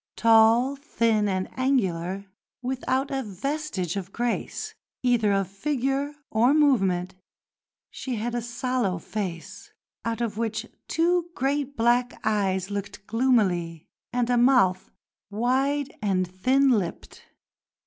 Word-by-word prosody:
Tall, 230 +4 +5
thin, 230 -6 +1
and 185 -1 -1
angular, 195 -8 0 0.4
without 260 +1 -1
a 270 -1 -1
vestige 215 - -3
of 195 -1 -5
grace 245 - -3 0.3
either 240 -4 +3
of 195 -1 +1
figure 275 - -2 0.2
or 240 +6 +4
movement, 195 -12 +2 0.8
she 255 -2 -4
had 235 +2 -3
a 240 - -1
sallow 240 -4 -1
face 175 -2 -6 0.3
out 230 0 -2
of 225 -2 -2
which 225 -1 -2 0.2
two 345 +1 +1
great 280 +1 -1
black 240 +2 +2
eyes 195 -3 0
looked 200 0 -5
gloomily, 195 -10 +1 0.3
and 245 0 0
a 245 - +3
mouth 235 -7 +3 0.4
wide 265 +6 0
and 190 -3 +1
thin 260 +10 +2
lipped. 200 -8 -2
230 Hz, 120 wpm, -26 LUFS, 195-265 Hz, 0.8 s, Tall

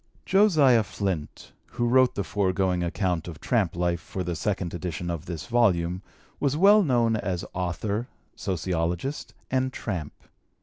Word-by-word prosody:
"Josiah 155 - +5
Flynt" 95 -7 -4 0.2
who 120 - 0
wrote 130 +1 +4
the 100 - -1
foregoing 95 -2 0
account 85 -1 -1
of 80 -3 -8
tramp 105 -10 0
life 85 -1 0
for 95 - -5
the 90 -1 -3
second 95 -1 -2
edition 85 0 -4
of 85 +1 -5
this 85 -3 -5
volume, 95 -7 +2 0.4
was 140 0 +1
well 205 +5 +7
known 120 - +2
as 90 -4 -3
author, 95 +6 -2 0.3
sociologist, 90 - -2 0.2
and 130 0 +1
tramp. 90 - -4
95 Hz, 140 wpm, -26 LUFS, 85-120 Hz, 0.4 s, well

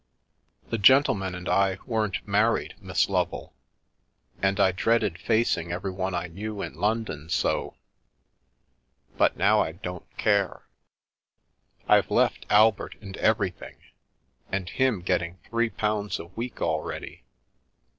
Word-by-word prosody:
The 115 - -1
gentleman 100 -6 +4
and 90 0 -7
I 95 -1 +2
weren't 110 -6 -2
married, 105 +3 +1
Miss - - 0
Lovel. - - -2 0.9
And 95 +1 +1
I 95 -1 +5
dreaded 105 -2 +1
facing 110 -7 +1
everyone 95 +1 -3
I 90 - -2
knew 100 +4 -6
in - - -6
London 105 -8 -2
so. 85 - 0 1.4
But - - +2
now - - +4
I 80 - -2
don't 90 0 -8
care. 100 -3 +1 1.2
I've - - +4
left - - +1
Albert 105 0 +4
and 100 -3 -9
everything, 105 -4 0 0.7
and 95 -1 -2
him 130 -8 +1
getting 90 -1 -1
three 115 0 0
pounds 105 -2 -1
a - - -8
week 115 +7 -6
already. 80 -2 -3
100 Hz, 120 wpm, -26 LUFS, 90-110 Hz, 1.4 s, I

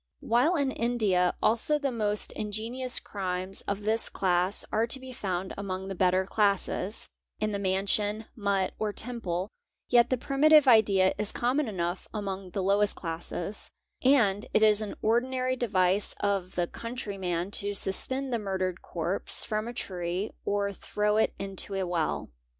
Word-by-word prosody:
While 250 +10 +3
in 280 -4 +1
India 215 -8 +1
also 235 +7 +3
the 280 -2 -1
most 210 -3 -1
ingen 215 +2 -4
ous 250 -1 -1
crimes 185 -1 -4
of 200 +1 -2
this 220 +2 +1
class 185 +1 0
are 225 +2 +1
to 265 - +1
be 260 0 -9
found 190 -4 -3
among 190 -1 -4
the - - -3
better 185 0 +2
classes, 200 0 0 0.3
in 215 0 0
the 200 - -2
Mansion, 200 +3 0
mutt, 200 -3 0
or 215 -1 0
temple, 200 -7 -2 0.4
yet 240 -1 +5
the 255 - +1
primitive 290 +3 +5
idea 200 -5 +5
is 210 -1 0
common 260 +4 0
enough 175 -3 -3
mong 195 -3 -4
the 195 - -1
lowest 200 +2 +2
classes; 170 +3 -6 0.3
and 225 -7 +3
it 215 - +5
is 215 -1 +5
an 210 - -5
ordinary 255 +3 +1
device 195 -5 +1
of 195 -2 -1
the 175 - +1
country 230 0 -6
man 180 0 -2
to 205 0 0
suspend 260 +8 +1
the 235 - +1
murdered 190 -3 -2
corpse 175 +3 +2
from 215 0 -2
a - - -4
tree 180 -2 -3
or 200 0 0
throw 210 +2 -1
it 220 - +2
into 195 0 -4
a 190 -1 -1
well. 170 - -2
205 Hz, 160 wpm, -28 LUFS, 190-230 Hz, 0.4 s, yet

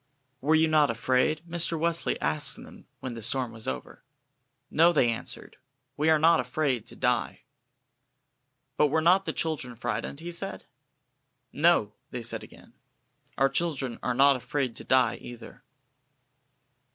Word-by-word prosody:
"Were 155 +4 +3
you 160 0 +4
not 155 -2 +4
afraid?" 130 +6 +1
Mr. 170 0 +1
Wesley 170 +1 0
asked - - +1
them - - -14
when 130 - -5
the 115 - -8
storm 120 +2 0
was 110 -1 -9
over. 65 -1 -6 0.7
"No," 165 +3 +5
they 130 -8 +3
answered, 115 - -8 0.4
"we 155 +2 +1
are 160 - +5
not 165 +2 +4
afraid 125 -1 -1
to - - -10
die." - - -1 1.4
"But 150 - +4
were 155 +3 +1
not 180 +4 +4
the - - -1
children 145 -7 -3
frightened?" 115 +4 -4
he 170 +2 -6
said. 195 +3 -5 0.9
"No," 150 -10 +3 0.2
they 125 -2 -6
said - - -3
again, - - -16 0.6
"our 135 - +4
children 135 -4 -2
are 125 - -1
not 140 +2 +5
afraid 130 -1 -2
to - - -8
die 130 0 +2
either." 120 -1 -11
140 Hz, 150 wpm, -27 LUFS, 125-160 Hz, 1.4 s, No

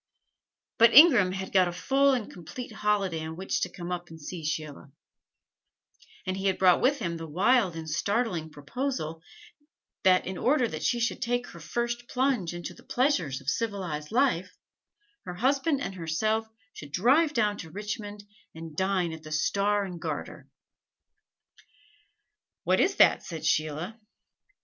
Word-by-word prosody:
But 230 0 +6
Ingram 250 - +8
had 190 0 -5
got 185 -2 +4
a - - -2
full 270 +10 +2
and 240 -5 -1
complete 180 +9 -8
holiday 205 -6 0
on 160 0 -6
which 190 +3 -2
to - - 0
come 175 -1 -7
up 175 -1 -4
and 160 0 -11
see 165 +2 -7
Sheila; 155 -2 -5 1.3
and 185 -1 -2
he 195 +1 -2
had 190 - +1
brought 185 -2 +5
with 280 +3 +3
him 170 -8 -3
the 165 0 -7
wild 195 +2 +2
and 160 -1 -6
startling 180 0 -1
proposal 160 - -4 0.8
that 185 -1 +4
in 185 0 -5
order 255 -1 +2
that - - -6
she 240 - +1
should 230 0 -1
take 245 0 0
her 170 - -12
first 240 +7 -3
plunge 250 -9 0
into 175 +1 -6
the - - -17
pleasures 180 - 0
of 135 - -19
civilized 180 -7 -2
life, 225 -8 +2 0.8
her 180 - -6
husband 275 - +1
and 195 - -4
herself 215 +6 -1 0.3
should 145 -1 -10
drive 275 - +3
down 210 -5 +1
to 165 - -8
Richmond 205 +2 -6 0.3
and 160 -1 -9
dine 190 -2 0
at 160 - -9
the 155 - -11
Star 200 +6 +1
and 180 -3 -8
Garter. - - -5 2.2
"What - - +2
is - - +2
that?" - - +5
said 160 -1 -7
Sheila. 155 +7 -1
190 Hz, 160 wpm, -28 LUFS, 165-235 Hz, 2.2 s, Ingram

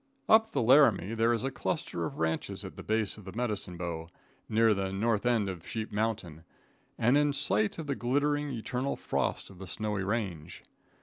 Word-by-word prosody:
Up 220 0 +6
the - - 0
Laramie 115 - +5
there 115 +1 +3
is 115 -2 0
a 135 - -1
cluster - - -2
of - - -6
ranches 80 0 -2
at - - -8
the - - -8
base 110 -1 0
of 100 - -14
the 95 - -8
Medicine 105 -6 -3
Bow, 85 -2 -4 0.4
near 110 0 +4
the 95 -1 -2
north 110 +3 0
end 115 -5 +2
of 90 -4 -6
Sheep 110 -1 -4
Mountain, 105 -7 -2 0.5
and 125 +6 +4
in 145 -1 +2
sight 105 -5 +1
of 165 - -5
the 140 - -1
glittering, 145 +4 0
eternal 125 +2 -2
frost - - -2
of 95 - -15
the 95 - -8
snowy 105 +1 -2
range. 95 -7 -3
110 Hz, 190 wpm, -30 LUFS, 95-125 Hz, 0.5 s, Up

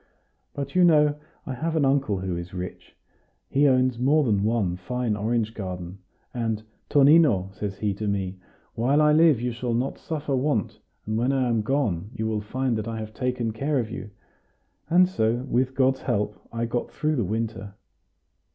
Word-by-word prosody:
But 140 -1 -4
you 180 - +4
know 150 -3 +4 0.3
I 135 - -4
have 160 +6 -2
an 150 -3 +3
uncle 135 -8 +1
who 95 -2 -2
is 85 +2 -6
rich; 90 0 -7 0.6
he 145 +2 +4
owns 130 -2 +2
more 145 +5 +3
than 105 -6 +1
one 105 -5 +1
fine 115 +4 -2
orange 110 +1 -1
garden; 90 -2 -6 0.3
and, 115 -3 -2 0.3
'Tonino,' 140 - +5
says 100 -1 -5
he 105 -2 -1
to 105 +2 -4
me, 95 -2 -2 0.3
'while 130 +6 +2
I 150 0 +5
live 155 -5 +5
you 125 +1 -1
shall 120 0 -2
not 125 +3 -2
suffer 150 -3 -3
want; 130 - -1 0.3
and 110 +1 -1
when 125 +3 +2
I 130 -2 +1
am 115 -2 +1
gone 105 - -1
you 110 - -2
will 110 -1 -1
find 125 +3 -1
that 110 - -5
I 115 -1 -4
have 110 -1 -6
taken 125 -2 -2
care 140 +6 -1
of 115 -3 -2
you.' 115 -3 -6 0.8
And 180 +2 +6
so, 120 -8 0
with 130 +1 0
God's 130 0 +2
help, 105 -4 -2
I 115 0 -2
got 120 +1 -2
through 155 0 -1
the 120 - +1
winter." 105 -1 -3
120 Hz, 185 wpm, -25 LUFS, 105-135 Hz, 0.8 s, And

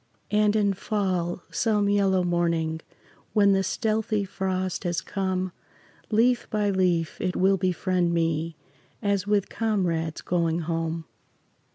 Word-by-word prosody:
And 210 0 +3
in 205 -2 +3
fall, 185 -4 -1
some 210 -3 +1
yellow 195 -2 +3
morning, 170 -2 0 0.5
When 200 -2 +5
the 195 0 +3
stealthy 215 +1 0
frost 185 -1 -2
has 175 -2 0
come, 185 -1 -2 0.6
Leaf 235 +3 +3
by 210 -1 +1
leaf 180 -4 +1
it 185 -1 -1
will 195 +1 +3
befriend 185 -1 +1
me 165 -1 0 0.5
As 200 -1 0
with 205 -2 +2
comrades 175 -8 -1
going 170 -1 0
home. 165 0 -2
185 Hz, 125 wpm, -26 LUFS, 170-205 Hz, 0.6 s, When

